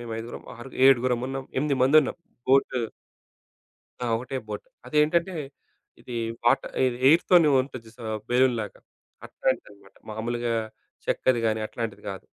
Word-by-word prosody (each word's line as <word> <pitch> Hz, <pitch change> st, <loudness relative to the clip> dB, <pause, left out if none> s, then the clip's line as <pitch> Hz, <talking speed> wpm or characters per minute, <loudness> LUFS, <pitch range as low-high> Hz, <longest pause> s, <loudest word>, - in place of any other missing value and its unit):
మేం 120 Hz, -1 st, -7 dB
ఐదుగురం, 115 Hz, +1 st, -7 dB
ఆరు 120 Hz, +3 st, -9 dB, 0.2 s
ఏడుగురమున్నాం, 130 Hz, +1 st, +2 dB
ఎనిమిదిమందుంన్నాం. 140 Hz, +1 st, +3 dB, 0.3 s
బోటు 135 Hz, -1 st, +4 dB, 1.3 s
ఆ! -, -, -1 dB
ఒకటే 130 Hz, +3 st, -5 dB
బోట్. 105 Hz, -, -6 dB, 0.2 s
అదేంటంటే 155 Hz, +6 st, +2 dB, 0.7 s
ఇది 125 Hz, -, -7 dB, 0.3 s
వాట్ 120 Hz, -, +4 dB, 0.2 s
ఇది 120 Hz, -1 st, -1 dB
ఎయిర్‌తోనే 165 Hz, 0 st, +6 dB
ఉంటది 130 Hz, -3 st, -6 dB
జూశావా? 110 Hz, -1 st, -7 dB, 0.2 s
బెలూన్‌లాగా 120 Hz, -4 st, +1 dB, 0.5 s
అట్లాంటిదనమాట. 100 Hz, -6 st, -3 dB, 0.2 s
మామూలుగా 120 Hz, +2 st, -2 dB, 0.5 s
చెక్కది‌ 130 Hz, -2 st, +2 dB
గాని 110 Hz, 0 st, +1 dB
అట్లాంటిది 115 Hz, -1 st, -5 dB
గాదు. 95 Hz, -1 st, -7 dB
125 Hz, 110 wpm, -26 LUFS, 115-135 Hz, 1.3 s, ఎయిర్‌తోనే